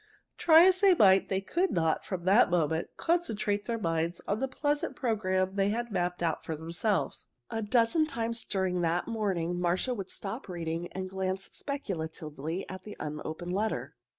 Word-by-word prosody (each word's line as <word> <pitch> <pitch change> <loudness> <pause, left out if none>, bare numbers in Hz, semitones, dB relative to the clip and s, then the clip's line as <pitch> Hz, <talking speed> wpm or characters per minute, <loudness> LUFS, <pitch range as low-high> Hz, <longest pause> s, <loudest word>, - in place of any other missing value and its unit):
Try 325 0 +8
as 370 0 +5
they 390 -2 +6
might, 195 - +5
they 190 0 0
could 345 - 0
not, 160 -2 +1
from 180 -3 -5
that 200 +4 +6
moment, 160 -2 +1
concentrate 215 -12 0
their 235 -1 -1
minds 165 -3 -1
on 205 - 0
the 270 - 0
pleasant 290 +4 -1
program 190 -6 0
they 195 0 +1
had 235 +2 -2
mapped 180 -2 -1
out 165 -2 0
for 160 - -3
themselves. 165 +1 -2 0.2
A 225 - -2
dozen 235 +8 +3
times 230 -5 -2
during 185 -2 -1
the 170 +1 +1
morning 185 -6 -1
Marcia 180 +8 +1
would 195 -5 -5
stop 205 +3 -5
reading 170 -1 -3
and 190 0 -4
glance 190 0 -3
speculatively 160 - -4
at 185 -1 -7
the 210 +2 -10
unopened 155 +3 -5
letter. 215 +3 -1
190 Hz, 170 wpm, -30 LUFS, 175-230 Hz, 0.2 s, Try